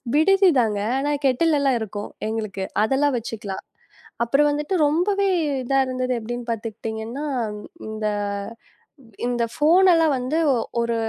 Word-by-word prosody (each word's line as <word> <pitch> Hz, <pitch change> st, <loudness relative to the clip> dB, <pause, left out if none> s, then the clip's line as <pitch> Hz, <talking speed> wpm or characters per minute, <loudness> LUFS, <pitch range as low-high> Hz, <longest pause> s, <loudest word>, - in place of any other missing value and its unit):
விடுதி 385 Hz, +5 st, +5 dB
தாங்க. 210 Hz, -3 st, 0 dB, 0.2 s
ஆனா, 290 Hz, +1 st, 0 dB, 0.2 s
கெட்டில் 300 Hz, +4 st, +2 dB
எல்லாம் 270 Hz, -3 st, +2 dB
இருக்கும் 205 Hz, -1 st, -5 dB, 0.2 s
எங்களுக்கு. 215 Hz, -3 st, -3 dB, 0.2 s
அதெல்லாம் 270 Hz, +4 st, +2 dB
வச்சுக்கலாம். 215 Hz, -4 st, -6 dB, 0.6 s
அப்புறம் 280 Hz, +5 st, +3 dB
வந்துட்டு 295 Hz, +5 st, -2 dB
ரொம்பவே 390 Hz, +7 st, +2 dB, 0.3 s
இதா 270 Hz, +2 st, 0 dB
இருந்தது 255 Hz, 0 st, -2 dB
எப்படின்னு 240 Hz, +2 st, -5 dB
பாத்துக்கிட்டீங்கன்னா, 225 Hz, +4 st, -5 dB, 0.6 s
இந்த 215 Hz, 0 st, -4 dB, 1.2 s
இந்த 245 Hz, -1 st, 0 dB
ஃபோன் 345 Hz, +6 st, +5 dB
எல்லாம் 325 Hz, -3 st, +4 dB
வந்து 255 Hz, +5 st, -2 dB, 0.2 s
ஒ 255 Hz, -, +2 dB, 0.2 s
ஒரு 235 Hz, 0 st, 0 dB
255 Hz, 125 wpm, -23 LUFS, 225-300 Hz, 1.2 s, விடுதி